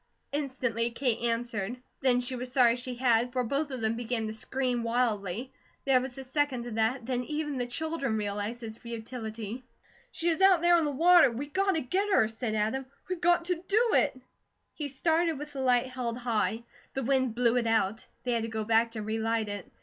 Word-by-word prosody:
Instantly 255 -5 -1
Kate 235 -1 0
answered. 230 -1 -2 0.2
Then 250 -2 +3
she 250 +1 -3
was 250 0 -5
sorry 245 -3 +5
she 250 0 -5
had, 240 -1 +2
for 250 0 0
both 280 +5 -1
of 260 -3 -5
them 220 0 +1
began 235 -1 -2
to 215 - -4
scream 250 +2 -1
wildly. 230 -1 -1 0.3
There 265 -2 +4
was 260 0 -6
a 270 - -6
second 265 -2 -1
of 240 - -6
that, 225 +3 0
then 250 0 -1
even 295 -2 -3
the 245 - -1
children 275 -3 -2
realized 210 +3 -3
its 220 0 -7
futility. 230 0 -6 0.5
"She 340 - 0
is 330 +2 0
out 380 -3 +6
there 345 0 +5
in 320 - +1
the 295 - 0
water, 335 +1 +6
WE 240 +4 -4
GOT 385 +6 +1
TO 320 - +1
GET 380 +11 0
HER," 220 - +5
said 225 0 -3
Adam. 220 +5 -1 0.2
"We 370 - -1
got 345 0 +3
to 350 -1 -2
do 450 +4 +3
it!" 260 - +2 0.5
He 295 - -4
started 325 +3 +1
with 295 +1 -8
the 270 - -4
light 250 -1 +3
held 250 -2 -4
high. 230 -1 -1 0.3
The 270 - -1
wind 260 -2 +1
blew 240 -1 +3
it 235 -2 +1
out. 220 -1 +1 0.2
They 250 - -1
had 235 -1 +1
to 225 - -3
go 220 -1 -2
back 225 +1 +3
to 220 -2 -4
relight 220 0 -1
it. 205 -2 -6
245 Hz, 210 wpm, -29 LUFS, 225-275 Hz, 0.5 s, out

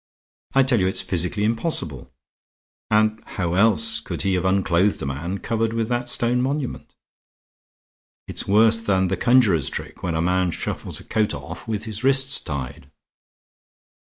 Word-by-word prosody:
I 135 - +6
tell 130 -3 +2
you 95 - +2
it's 95 - -2
physically 90 +3 -2
impossible. 110 - -1 0.8
And 110 0 +2
how 85 -3 -3
else 115 - +2
could - - -5
he 95 -1 +1
have 90 0 0
unclothed 95 0 +2
a - - -2
man 75 +8 -3
covered 115 +1 -1
with 115 0 -1
that 120 0 -1
stone 120 0 +1
monument? 135 +1 -3 1.3
It's - - -2
worse 110 +3 +5
than 95 -4 +1
the 95 - 0
conjurer's 110 - +3
trick, - - -7
when 85 -3 -2
a - - 0
man 90 +1 +1
shuffles - - -4
a - - -12
coat 110 -7 0
off 70 -1 -9
with 110 -1 -3
his 110 +1 -5
wrists 135 0 +4
tied." 70 -1 -6
105 Hz, 160 wpm, -22 LUFS, 90-115 Hz, 1.3 s, I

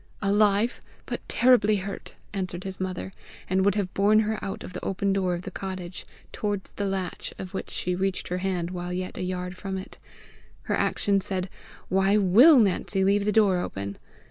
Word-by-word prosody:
"Alive, 205 +3 +3 0.2
but - - -4
terribly 240 -4 +4
hurt," 200 0 -6 0.2
answered 185 -2 -3
his 190 -1 -6
mother, 185 0 -4 0.3
and 190 +1 +2
would 200 0 +3
have 195 -3 -2
borne 210 +2 +4
her 215 0 -2
out 195 - -4
of 185 - -9
the 180 - -6
open 195 +1 0
door 185 -2 +1
of 175 - -6
the 190 - -6
cottage, 185 -2 -6 0.2
towards 205 -2 -3
the 205 - -2
latch 190 -2 -3
of 190 0 -7
which 190 - -4
she 180 - -2
reached 190 +1 -1
her 180 +1 -1
hand 180 -2 -2
while 180 -1 -4
yet 185 +1 -4
a - - -5
yard 180 0 -3
from 190 0 -4
it. 190 - -9 0.6
Her - - 0
action 200 -1 +1
said, 185 -1 -2 0.4
"Why 195 +2 +3
WILL 225 - +7
Nancy 195 -2 +2
leave 200 +1 +3
the 210 - +2
door 200 -4 +4
open!" 100 - -5
190 Hz, 190 wpm, -26 LUFS, 185-200 Hz, 0.6 s, WILL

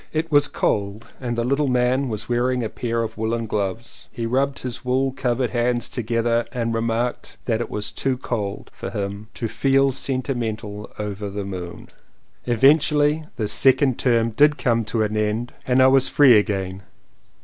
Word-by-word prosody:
It 160 +1 -2
was 145 0 +5
cold 100 -1 -1
and 120 -2 -3
the 115 - +1
little 140 +4 +1
man 125 +1 +1
was 110 0 -5
wearing 125 +1 0
a 110 - -2
pair 115 -1 -2
of 110 0 -6
woolen 115 +1 -1
gloves. 105 +2 -4
He 115 -3 -4
rubbed 135 +4 0
his 125 -1 -5
wool 130 +2 +1
covered 125 -2 -1
hands 120 0 0
together 115 0 0
and 115 -2 -2
remarked 115 +2 -2
that 115 -1 0
it - - -4
was 105 0 -4
too 135 -1 -1
cold 105 -6 -4
for - - -6
him 100 +1 -5
"to 115 - -2
feel 135 +3 +2
sentimental 120 -6 -3
over 105 -1 -4
the 100 0 -5
moon!" 90 -3 -7 0.6
Eventually 150 +5 +3
this 105 -2 -1
second 135 0 +3
term 115 -2 +2
did 145 +6 +4
come 115 -4 +1
to 110 +1 0
an 105 0 -2
end 110 +3 -1
and 130 0 +4
I - - +7
was 135 0 +4
free 135 -5 +6
again. 95 -3 0
120 Hz, 170 wpm, -22 LUFS, 110-130 Hz, 0.6 s, I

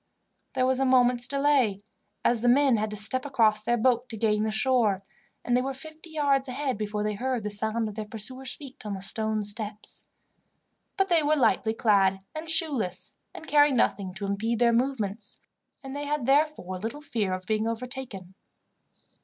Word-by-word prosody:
There 255 -1 +1
was 260 0 +1
a - - +2
moment's 250 -1 +4
delay, 275 -8 +2 0.4
as 235 -2 +3
the 245 - +1
men 270 -1 +4
had 215 +1 -1
to 210 - -6
step 220 +5 -1
across 225 -6 +2
their 240 +3 +1
boat 245 +1 +1
to 225 - -6
gain 210 -1 +1
the - - 0
shore, 220 -4 +2 0.4
and 245 - +2
they 250 - +3
were 270 +1 -3
fifty 315 +4 -11
yards 285 -3 +1
ahead 265 +1 -2
before 210 0 -3
they 210 0 -1
heard 250 +2 -2
the 210 - -3
sound 220 +2 0
of 210 - -6
their 215 0 -6
pursuers' 255 +5 -3
feet 275 -3 -11
on 210 -2 -4
the 190 - -7
stone 215 +1 -1
steps; 210 0 -4 0.9
but 390 -1 +2
they 340 -2 +4
were 300 +1 +2
lightly 225 -4 +2
clad 195 -4 +3
and 315 +1 -6
shoeless, 280 - 0 0.2
and - - -9
carried 290 -2 +5
nothing 200 -5 +1
to 200 - -4
impede 215 +4 -1
their 235 0 +3
movements, 230 -5 -2 0.4
and 270 0 -7
they 290 0 -4
had 295 -3 -1
therefore 275 - +1
little 230 +9 -5
fear 230 -10 -2
of 185 0 -4
being 215 +2 0
overtaken. 230 -5 -5
235 Hz, 185 wpm, -27 LUFS, 210-270 Hz, 0.9 s, carried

